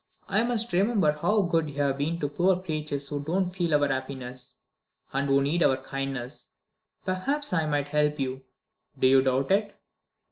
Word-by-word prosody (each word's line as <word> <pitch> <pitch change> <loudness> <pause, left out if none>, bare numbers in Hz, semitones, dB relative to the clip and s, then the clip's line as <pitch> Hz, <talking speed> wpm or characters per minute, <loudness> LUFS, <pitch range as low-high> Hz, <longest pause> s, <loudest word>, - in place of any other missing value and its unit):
I 215 - +2
must 235 -2 0
remember 195 -3 +3
how 205 +8 +1
good 165 -3 +1
you 145 - -10
have 140 -1 0
been 160 +4 0
to 145 - +1
poor 180 +5 +2
creatures 155 -5 -4
who 145 -1 -3
don't 180 +4 0
feel 175 -4 0
our 145 -1 +3
happiness, 130 -2 -5 0.6
and 140 +1 0
who 135 0 +4
need 160 +5 0
your 130 - +4
kindness. 135 -2 -5 0.6
Perhaps 260 +9 -1
I 160 -3 +1
might 145 -1 -1
help 150 0 +1
you? 130 -1 -2 0.6
Do - - +1
you 130 0 +6
doubt 130 +2 +1
it?" 205 +1 +1
150 Hz, 175 wpm, -27 LUFS, 135-185 Hz, 0.6 s, you